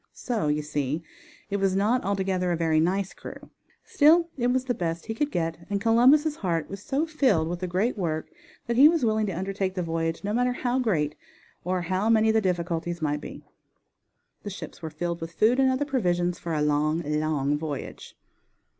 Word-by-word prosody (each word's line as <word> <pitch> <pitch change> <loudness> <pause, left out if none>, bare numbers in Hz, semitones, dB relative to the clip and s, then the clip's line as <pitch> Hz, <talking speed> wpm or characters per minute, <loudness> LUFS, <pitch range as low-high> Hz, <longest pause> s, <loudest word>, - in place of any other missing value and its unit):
So, 225 -10 -2
you 150 0 0
see, 150 +1 -2 0.5
it 200 - +1
was 195 -1 +1
not 220 +6 +2
altogether 190 -2 0
a 170 - 0
very 160 -1 +2
nice 190 +4 0
crew, - - -11 0.3
still 330 +3 +4
it 245 -2 0
was 255 +1 +1
the 250 - 0
best 170 -4 -3
he 225 - -3
could 290 +6 -1
get, 165 - -2
and 200 -1 0
Columbus' 260 +8 +4
heart 165 -5 -1
was 195 -1 -7
so 280 +8 -1
filled 260 - +2
with 175 +1 -4
the 185 - -3
great 200 +6 -1
work 160 -3 -2 0.4
that 235 -1 -1
he 285 +4 +9
was 325 -6 +1
willing 215 -1 +1
to - - -2
undertake 190 0 -2
the 180 - -1
voyage 165 0 -2
no 205 +1 -2
matter 245 +2 +1
how 245 +1 -1
great 160 - 0 0.5
or 180 +1 -1
how, 185 +5 0
many 220 -1 +4
the 220 0 +2
difficulties 175 -2 -2
might 150 -2 -1
be. - - -9 1.0
The 205 - -6
ships 195 - -9
were 160 - -5
filled 170 +2 -4
with 165 +1 -6
food 230 +7 +3
and 265 -1 +4
other 260 +3 0
provisions 180 - 0
for 165 -2 -3
a 150 - +1
long, 150 +2 +1
long 150 -1 0
voyage. 145 -2 -6
185 Hz, 200 wpm, -26 LUFS, 165-235 Hz, 1.0 s, he